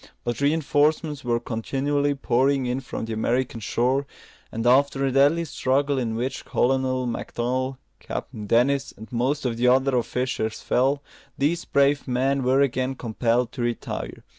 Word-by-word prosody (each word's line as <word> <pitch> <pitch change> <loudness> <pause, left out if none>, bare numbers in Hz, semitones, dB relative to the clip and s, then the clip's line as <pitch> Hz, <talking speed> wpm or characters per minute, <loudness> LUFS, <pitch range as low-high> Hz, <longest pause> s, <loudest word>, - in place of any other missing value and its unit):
But 120 +3 -3
reinforcements 150 0 +1
were 120 -1 +1
continually 140 +5 -1
pouring 135 +1 +1
in 125 +1 -1
from 130 -3 -5
the 115 - -4
American 120 +2 -1
shore; 130 +5 0 0.4
and 115 +1 -4
after 135 +2 +3
a 135 - +1
deadly 145 +5 +3
struggle, 140 -1 0
in 115 -3 -2
which 125 +3 -3
Colonel 130 0 +1
Macdonell, 130 +2 -2 0.2
Captain 105 -2 -6
Dennis, 135 +5 +2
and 110 +4 -11
most 130 +4 0
of 120 -2 -1
the 125 +1 +2
other 130 +1 +3
officers 120 -2 -1
fell, 135 +3 +1 0.3
these 155 +5 0
brave 140 +1 +2
men 135 +2 +1
were 130 +2 +3
again 130 -1 0
compelled 120 +1 0
to 125 - -6
retire. 120 0 -4
130 Hz, 150 wpm, -24 LUFS, 120-140 Hz, 0.4 s, after